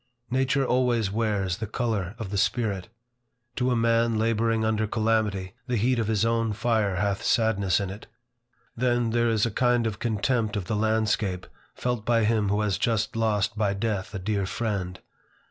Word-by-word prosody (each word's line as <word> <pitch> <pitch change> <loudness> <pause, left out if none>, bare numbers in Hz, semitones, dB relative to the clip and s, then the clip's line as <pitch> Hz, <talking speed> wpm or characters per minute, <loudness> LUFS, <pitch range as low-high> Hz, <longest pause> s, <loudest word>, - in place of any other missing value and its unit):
Nature 135 +1 +1
always 120 -5 +1
wears 100 -4 0
the 110 - -4
colors 105 -4 -2
of 110 -5 -6
the 100 - -1
spirit. 100 -5 -1 0.7
To 125 0 +1
a 125 - +2
man 115 0 +2
laboring 115 0 +1
under 110 0 +1
calamity, 110 -4 0
the 125 - 0
heat 120 +3 +2
of 110 - 0
his 110 -1 +1
own 115 -1 +1
fire 110 -3 +1
hath 100 +1 0
sadness 105 -5 +2
in 100 -2 -3
it. 100 +3 -10 0.7
Then, 120 -1 +1
there 120 0 +2
is 110 -1 +2
a 115 - -1
kind 120 +1 +2
of 110 -3 -3
contempt 110 -1 0
of 100 -3 -2
the 105 - -2
landscape 105 -3 0 0.3
felt 125 -3 -2
by 115 0 +2
him 105 -2 +2
who 105 +1 +1
has 105 -3 0
just 115 0 0
lost 105 -3 +1
by 105 -2 0
death 105 -2 -2
a - - -1
dear 100 0 -1
friend. 95 -5 -3
110 Hz, 180 wpm, -26 LUFS, 100-115 Hz, 0.7 s, a